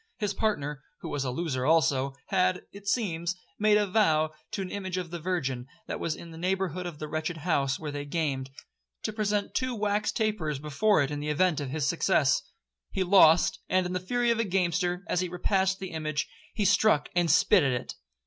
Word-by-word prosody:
His 205 -2 -1
partner, 150 -10 -1 0.2
who - - -6
was 140 - -2
a 130 - -2
loser 130 -1 -2
also, 140 -3 +2
had, 185 -1 +1
it 200 0 -12
seems, 175 -6 0 0.2
made 210 0 +5
a 210 - +2
vow 160 -7 +2 0.2
to 195 - -3
an 185 - -7
image 190 -2 -4
of 175 -2 -4
the 175 - -4
Virgin, 135 -8 -2 0.2
that - - -4
was 165 -2 -1
in 170 +1 -10
the 160 - -10
neighbourhood 185 -1 -1
of 170 -4 -7
the 155 - -5
wretched 155 +2 -3
house 140 -4 0
where 155 -2 -5
they 145 0 -4
gamed, 145 -3 -2 0.5
to 215 - -2
present 210 -1 -1
two 255 -1 -1
wax 210 -1 0
tapers 210 - -1
before 150 +6 +2
it 140 - -3
in 145 - -3
the 150 +1 -3
event 155 +1 +2
of 140 -3 -4
his 150 +1 -1
success. 160 -4 +2 0.5
He 190 - -1
lost; 175 -3 +5
and, 185 0 +2
in 180 - -3
the 180 - 0
fury 240 +6 +1
of 230 - 0
a - - +3
gamester, 180 -2 0
as - - 0
he 180 -1 -1
repassed 190 +2 +1
the 190 -2 -6
image, 155 -2 -2 0.3
he 210 -3 0
struck 190 -5 +3
and 175 -1 +2
spit 180 +5 +5
at 135 - +2
it. - - -8
175 Hz, 210 wpm, -28 LUFS, 150-195 Hz, 0.5 s, made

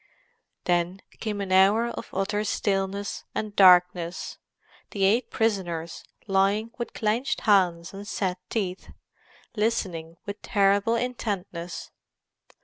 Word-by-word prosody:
Then 175 +2 0 0.2
came 210 -2 -3
an 195 -1 -4
hour 200 +5 +5
of - - -7
utter 200 +2 -1
stillness 200 -1 -1
and 210 -1 -3
darkness; 180 -2 +4 0.5
the 200 - -2
eight 220 +6 +3
prisoners 175 -7 -1 0.2
lying 200 +3 +1
with 235 - -4
clenched 235 +8 0
hands 180 -5 +2
and 200 +1 -8
set 185 -4 -2
teeth, 190 -4 -3 0.7
listening 185 -7 -1
with 200 0 -6
terrible 200 +2 +2
intentness. 200 -8 -4
195 Hz, 110 wpm, -26 LUFS, 180-215 Hz, 0.7 s, hour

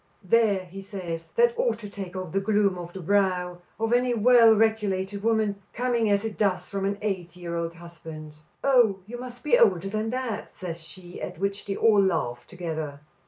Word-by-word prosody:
"There," 200 -2 +2
says 175 -4 -6
he, - - -31
"that 475 0 +4
ought - - +1
to 215 - -8
take 195 -3 -7
the 185 0 -2
gloom 200 -1 +2
off 175 0 -7
the 190 - -8
brow 180 -1 +1 0.2
of 225 +1 +1
any 245 0 +2
well 230 0 +6
regulated 205 -3 0
woman, 215 -2 +1
coming 240 -3 +1
as 200 +1 +2
it 220 - -5
does 200 -4 +1
from 195 -1 -3
an 200 0 -1
eight 185 -5 -3
year 175 -1 -5
old 170 0 -3
husband." 160 -3 -10 0.3
"Oh, 245 -7 +4
you 240 +3 -8
must 245 -1 -9
be 270 -5 +4
older 195 -4 +4
than 215 +2 -2
that," 250 -3 -4
says 170 -3 -6
she, 175 +2 -11
at 180 - -5
which 200 +3 -2
they 195 - -2
all 210 -2 +5
laugh 155 -11 -1
together. 160 -5 -5
200 Hz, 190 wpm, -26 LUFS, 180-225 Hz, 0.3 s, well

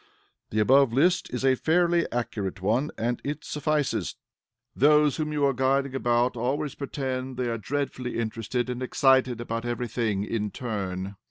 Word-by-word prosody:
The 105 - -4
above 135 +3 +5
list 175 +9 +2
is 125 +2 -2
a 135 - +5
fairly 170 +4 +2
accurate 105 -6 -3
one, 115 +10 +1
and 120 +2 -1
it 145 +1 -4
suffices. 150 -1 -1 0.6
Those 150 0 +4
whom 155 -1 -2
you 145 -1 +1
are 140 - +3
guiding 135 +1 +1
about 120 -1 +1
always 135 +4 -1
pretend 130 -2 -4
they 125 -1 -1
are 115 -1 -2
dreadfully 130 0 -3
interested 115 +2 -2
and 125 0 -4
excited 130 -2 +3
about 115 -1 -3
every 120 0 -2
thing 110 -4 -1
in 105 -1 -2
turn. 100 -4 -4
130 Hz, 160 wpm, -26 LUFS, 115-140 Hz, 0.6 s, above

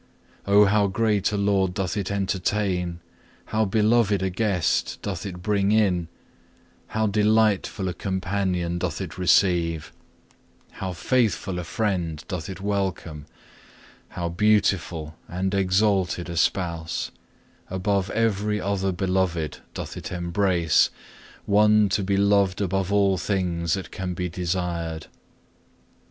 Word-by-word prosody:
Oh 100 +1 +6
how 100 0 +3
great 105 0 +1
a 105 - -1
Lord 100 -2 +1
doth 95 -2 -2
it 100 -3 -2
entertain, 95 -3 -1 0.4
how 110 0 0
beloved 105 -1 +2
a 95 - 0
Guest 95 -3 0
doth 100 -1 -4
it 90 -2 -8
bring 100 -1 +1
in, 95 -6 +2 0.8
how 110 0 -1
delightful 105 -2 +2
a 90 - -2
Companion 95 -2 -2
doth - - -2
it - - -6
receive, 85 -4 +2 0.8
how 95 -1 -5
faithful 100 -1 0
a - - -4
Friend 85 -5 -2
doth 90 -2 -4
it 95 -2 -7
welcome, 95 -7 -3 0.8
how 85 -1 -4
beautiful 90 -4 +1
and 95 +3 -2
exalted 95 -2 +1
a - - -5
Spouse, 85 -3 -1 0.6
above 95 +1 0
every 105 -2 0
other 95 -1 -1
Beloved, 90 -4 -1 0.2
doth - - -6
it - - -7
embrace, 85 -2 +2 0.6
One 105 0 +4
to 100 - +1
be 100 +1 +1
loved 100 -2 +3
above 95 -1 -1
all 100 -2 +3
things 85 -4 0
that 95 - -7
can 90 -1 -4
be 90 +1 -2
desired! 85 -2 -3
95 Hz, 125 wpm, -24 LUFS, 90-100 Hz, 0.8 s, Oh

